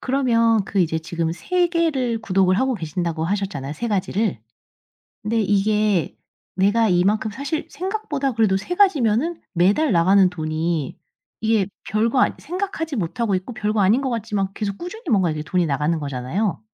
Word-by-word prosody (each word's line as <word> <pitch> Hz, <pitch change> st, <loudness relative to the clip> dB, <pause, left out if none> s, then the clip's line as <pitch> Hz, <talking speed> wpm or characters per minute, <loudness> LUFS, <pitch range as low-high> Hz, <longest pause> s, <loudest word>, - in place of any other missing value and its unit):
그러면 230 Hz, -5 st, +2 dB
그 195 Hz, -, -1 dB
이제 160 Hz, -2 st, +1 dB
지금 165 Hz, 0 st, -3 dB
3 360 Hz, -, 0 dB
개를 290 Hz, -9 st, 0 dB
구독을 190 Hz, -2 st, +2 dB
하고 260 Hz, +1 st, +1 dB
계신다고 165 Hz, -2 st, -3 dB
하셨잖아요, 190 Hz, -7 st, -3 dB
3 235 Hz, +10 st, -3 dB
가지를. 205 Hz, -, 0 dB, 0.8 s
근데 225 Hz, +2 st, 0 dB
이게 205 Hz, -3 st, +1 dB, 0.4 s
내가 205 Hz, +4 st, +3 dB
이만큼 200 Hz, +5 st, +2 dB
사실 280 Hz, +7 st, -4 dB
생각보다 360 Hz, -8 st, -2 dB
그래도 215 Hz, -4 st, +2 dB
3 275 Hz, -, -4 dB
가지면은 320 Hz, -, +2 dB
매달 200 Hz, -, +3 dB
나가는 185 Hz, +2 st, +5 dB
돈이 160 Hz, -3 st, -2 dB, 0.4 s
이게 220 Hz, -3 st, +2 dB, 0.2 s
별 215 Hz, +2 st, +2 dB
거 255 Hz, -, +1 dB
아니 -, -, +3 dB
생각하지 350 Hz, -2 st, -4 dB
못하고 210 Hz, +1 st, -1 dB
있고 185 Hz, +7 st, -4 dB
별거 210 Hz, -1 st, 0 dB
아닌 210 Hz, +7 st, +4 dB
것 270 Hz, -, -1 dB
같지만 215 Hz, -4 st, -1 dB
계속 200 Hz, -2 st, -3 dB
꾸준히 380 Hz, +7 st, -7 dB
뭔가 190 Hz, -5 st, +3 dB
이제 155 Hz, -1 st, -3 dB
돈이 175 Hz, +3 st, 0 dB
나가는 150 Hz, +4 st, 0 dB
거잖아요. 145 Hz, -, -2 dB
210 Hz, 350 characters per minute, -22 LUFS, 180-250 Hz, 0.8 s, 나가는